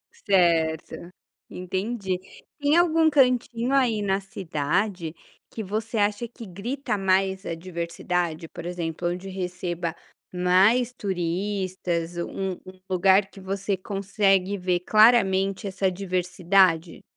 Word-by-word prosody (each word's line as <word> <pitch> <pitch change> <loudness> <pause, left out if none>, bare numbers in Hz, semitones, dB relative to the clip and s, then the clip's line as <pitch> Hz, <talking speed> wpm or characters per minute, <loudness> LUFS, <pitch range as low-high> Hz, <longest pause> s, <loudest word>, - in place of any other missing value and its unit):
Certo. 170 - +1 0.4
Entendi. 190 +2 -3 0.4
Tem 290 +3 +3
algum 325 -2 +4
cantinho 250 -3 +2
aí 245 -6 +2
na 195 0 +1
cidade 185 -2 -2 0.4
que 220 - -6
você 220 +3 -3
acha 210 +2 +1
que 235 0 -11
grita 230 +6 -3
mais 190 0 +1
a 165 - -3
diversidade? 170 -1 -3
Por 170 +1 -9
exemplo, 175 -1 -3
onde 180 +2 -5
receba 180 -2 -4 0.4
mais 195 +8 +3
turistas, 180 -3 -2
um 190 +2 -3
um 185 0 -12
lugar 190 +2 +4
que - - -14
você 195 +1 -2
consegue 195 0 0
ver 180 -1 0
claramente 195 -3 +4
essa 190 0 0
diversidade? 180 -2 +1
190 Hz, 110 wpm, -25 LUFS, 180-210 Hz, 0.4 s, algum